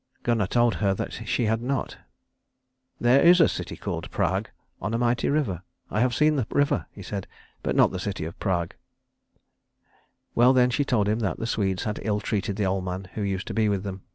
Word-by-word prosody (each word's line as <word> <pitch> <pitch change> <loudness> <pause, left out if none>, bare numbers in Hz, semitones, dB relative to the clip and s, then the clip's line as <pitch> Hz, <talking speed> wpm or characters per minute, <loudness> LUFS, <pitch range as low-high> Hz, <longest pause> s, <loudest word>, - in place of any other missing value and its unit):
Gunnar 115 -5 +1
told 120 +2 +3
her 100 -2 +2
that - - -4 0.2
she 120 - +1
had 110 +1 +1
not. 130 +2 -2 1.0
"There 125 +3 +5
is 175 +1 +7
a 165 - +7
city - - -5
called - - -4
Prag, 95 +5 -1 0.3
on 105 +5 -2
a - - +1
mighty 120 0 +1
river. 135 - 0 0.3
I 105 - 0
have 125 0 +2
seen 150 +2 +3
the 120 -5 -1
river," 145 0 +1
he 100 - -11
said, 95 +1 -5 0.3
"but - - -1
not - - +5
the 95 - -4
city 95 -4 -3
of 80 - -8
Prag." 85 -3 -1 1.6
Well 125 +2 +5
then 125 -1 +4
she 145 - +1
told 115 -7 +1
him 105 +2 +1
that 100 -5 -1
the 115 - -3
Swedes 95 -5 -1
had 105 0 -3
ill 105 -1 0
treated 100 -2 -2
the 105 -1 0
old 95 0 0
man 95 +1 -5
who 110 - -4
used 100 -2 -2
to - - -5
be 110 -1 +2
with 100 -2 -1
them. 95 -1 -6
105 Hz, 210 wpm, -26 LUFS, 95-120 Hz, 1.6 s, is